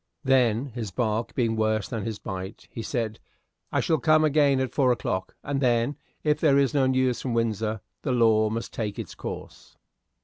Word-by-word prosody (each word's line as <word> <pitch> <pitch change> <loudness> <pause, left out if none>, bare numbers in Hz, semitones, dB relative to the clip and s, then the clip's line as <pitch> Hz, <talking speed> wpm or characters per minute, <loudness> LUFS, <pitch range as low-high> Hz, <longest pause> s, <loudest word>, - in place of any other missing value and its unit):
Then, 130 -3 +3
his 115 -3 -5
bark 110 +3 -1
being 115 -3 +1
worse 110 -1 +1
than 115 -4 -4
his 110 -2 -3
bite, 95 0 -7
he 115 - -5
said, 110 -2 -3 0.5
"I - - +2
shall 160 - +1
come 155 0 +4
again 145 -3 +3
at 130 -1 -2
four 130 -3 +3
o'clock, 95 -6 -2
and 140 -1 -2
then, 120 +2 +2 0.3
if 150 -1 +2
there 145 -4 +4
is 140 +1 +3
no 135 -2 +3
news 130 -1 +1
from 125 -3 -2
Windsor, 110 -2 -1 0.2
the 135 - -1
law 110 -3 +4
must 115 +2 -4
take 105 -3 -3
its - - -6
course." - - -8
120 Hz, 190 wpm, -26 LUFS, 110-135 Hz, 0.5 s, come